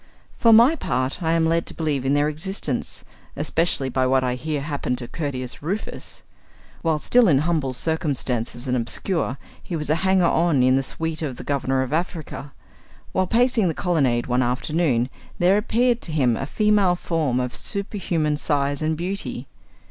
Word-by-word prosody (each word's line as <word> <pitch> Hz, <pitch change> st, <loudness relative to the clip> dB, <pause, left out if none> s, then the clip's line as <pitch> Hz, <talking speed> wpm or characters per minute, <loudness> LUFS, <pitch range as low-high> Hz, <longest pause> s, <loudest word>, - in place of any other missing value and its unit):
For 230 Hz, -, +4 dB
my 235 Hz, +8 st, +7 dB
part, 130 Hz, -, -2 dB
I 165 Hz, -1 st, +1 dB
am 165 Hz, -1 st, +2 dB
led 165 Hz, +1 st, +1 dB
to -, -, -7 dB
believe 150 Hz, -5 st, -1 dB
in 135 Hz, +2 st, +2 dB
their 145 Hz, +1 st, +2 dB
existence, 155 Hz, -3 st, -3 dB, 0.3 s
especially 155 Hz, -2 st, 0 dB
by 130 Hz, 0 st, +1 dB
what 130 Hz, 0 st, +3 dB
I 125 Hz, -1 st, 0 dB
hear 145 Hz, +3 st, -3 dB
happened 140 Hz, -4 st, -2 dB
to 120 Hz, -1 st, -6 dB
Curtius 130 Hz, -5 st, -5 dB
Rufus. 190 Hz, +9 st, -5 dB, 0.6 s
While 160 Hz, -2 st, +1 dB
still 240 Hz, +9 st, +4 dB
in 145 Hz, -6 st, +5 dB
humble 150 Hz, -2 st, 0 dB
circumstances 130 Hz, -4 st, -1 dB
and 125 Hz, -, +1 dB
obscure, 130 Hz, +4 st, -1 dB, 0.2 s
he 175 Hz, -, -5 dB
was 150 Hz, -1 st, -2 dB
a 155 Hz, -, +3 dB
hanger 190 Hz, -1 st, +3 dB
on 165 Hz, -5 st, +3 dB
in 130 Hz, +1 st, +4 dB
the 135 Hz, -, +2 dB
suit 160 Hz, +4 st, -4 dB
of 135 Hz, -6 st, -3 dB
the -, -, -7 dB
Governor 135 Hz, -2 st, 0 dB
of 130 Hz, -, -5 dB
Africa. 160 Hz, -4 st, -3 dB, 0.6 s
While 185 Hz, 0 st, +1 dB
pacing 235 Hz, -1 st, +3 dB
the 160 Hz, -, -1 dB
colonnade 135 Hz, -10 st, +1 dB
one 125 Hz, 0 st, +1 dB
afternoon, 130 Hz, 0 st, 0 dB, 0.3 s
there 180 Hz, +3 st, +4 dB
appeared 240 Hz, +2 st, +1 dB
to 165 Hz, -, -5 dB
him 130 Hz, -7 st, +2 dB
a 135 Hz, -, -4 dB
female 210 Hz, -1 st, +3 dB
form 155 Hz, -8 st, -1 dB
of 125 Hz, -1 st, -2 dB
superhuman 175 Hz, -7 st, -1 dB
size 145 Hz, -1 st, 0 dB
and 155 Hz, 0 st, 0 dB
beauty. 170 Hz, -8 st, -4 dB
155 Hz, 175 wpm, -23 LUFS, 130-175 Hz, 0.6 s, my